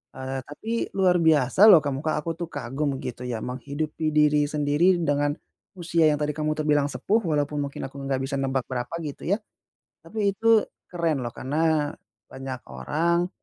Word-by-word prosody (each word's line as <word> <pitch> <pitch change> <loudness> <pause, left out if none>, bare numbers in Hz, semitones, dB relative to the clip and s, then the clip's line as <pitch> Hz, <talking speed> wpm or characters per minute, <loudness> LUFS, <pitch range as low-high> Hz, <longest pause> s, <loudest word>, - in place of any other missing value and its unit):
Eee, 130 0 -4
tapi 220 +10 -6 0.2
luar 185 -2 +4
biasa 160 +2 +4
loh 175 -7 +9
kamu 140 -2 -2
Kak, 155 - +1
aku 165 - -2
tuh 170 - -4
kagum 135 +3 -3
gitu 125 +1 -6
ya, 115 -3 -3
menghidupi 145 +5 -3
diri 150 -1 +4
sendiri 150 +5 +2
dengan, 145 -2 +1 0.4
usia 170 -2 +2
yang 150 - +3
tadi 150 0 0
kamu 155 +1 -2
terbilang 150 -2 +2
sepuh 210 +9 0
walaupun 150 -2 0
mungkin 140 - -7
aku 135 +1 -7
enggak 135 -1 -2
bisa 140 +1 -2
nebak 135 -1 0
berapa, 125 +3 -3
gitu 145 0 -6
ya. 200 +4 +2 0.6
Tapi, 210 -2 -1
itu 225 +1 +4 0.2
keren 165 -5 -1
loh 120 - -3
karena, 150 +1 0 0.4
banyak 130 -1 -6
orang, 170 - 0
150 Hz, 170 wpm, -25 LUFS, 135-165 Hz, 0.6 s, loh